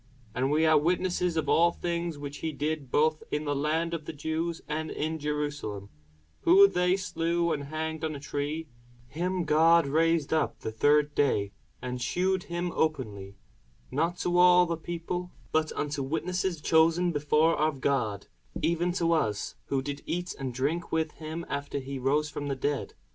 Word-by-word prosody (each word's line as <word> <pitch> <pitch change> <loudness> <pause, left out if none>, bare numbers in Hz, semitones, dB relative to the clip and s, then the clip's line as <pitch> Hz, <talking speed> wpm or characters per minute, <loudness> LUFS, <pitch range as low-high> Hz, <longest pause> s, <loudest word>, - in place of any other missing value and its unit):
And 130 +2 0
we 155 +2 +3
are 155 -1 +6
witnesses 180 +1 0
of 155 -2 0
all 170 +1 +4
things 170 -2 -3
which 145 0 -6
he 160 - -3
did 150 -1 -3
both 155 +3 +2
in 150 +1 -2
the 145 -1 0
land 160 +4 0
of 160 -2 -4
the - - -5
Jews, 160 +3 -2
and 155 +1 -3
in 160 +1 -3
Jerusalem; 145 -9 -3 0.5
whom 390 +4 +7
they 180 +1 +2
slew 170 -2 0
and 145 -2 -4
hanged 160 +2 -4
on 155 -1 -2
a - - -6
tree: 150 +3 -3 0.4
him 180 +5 -1
God 165 +1 +5
raised 160 +1 +2
up 160 - 0
the 110 - -3
third 145 +6 +3
day, 105 -9 +1 0.3
and 125 0 -4
shewed 185 +7 0
him 175 +1 -3
openly; 105 -11 -2 0.5
not 165 +5 0
to 175 0 +1
all 180 0 +7
the 170 -1 -1
people, 175 +2 -5 0.2
but 155 0 +1
unto 145 -1 -2
witnesses 170 +4 -2
chosen 165 +3 +3
before 150 +2 +2
of 155 -2 0
God, 120 -8 0 0.3
even 170 +1 +1
to 170 -2 +1
us, 105 -10 0
who 135 -1 -1
did 145 +1 -5
eat 175 +1 -2
and 135 -2 -3
drink 145 +8 -2
with 160 -1 0
him 160 +2 -6
after 140 0 -3
he 135 0 -5
rose 145 +4 +1
from 145 -1 -5
the 140 - -1
dead. 145 +2 -2
155 Hz, 175 wpm, -28 LUFS, 145-170 Hz, 0.5 s, whom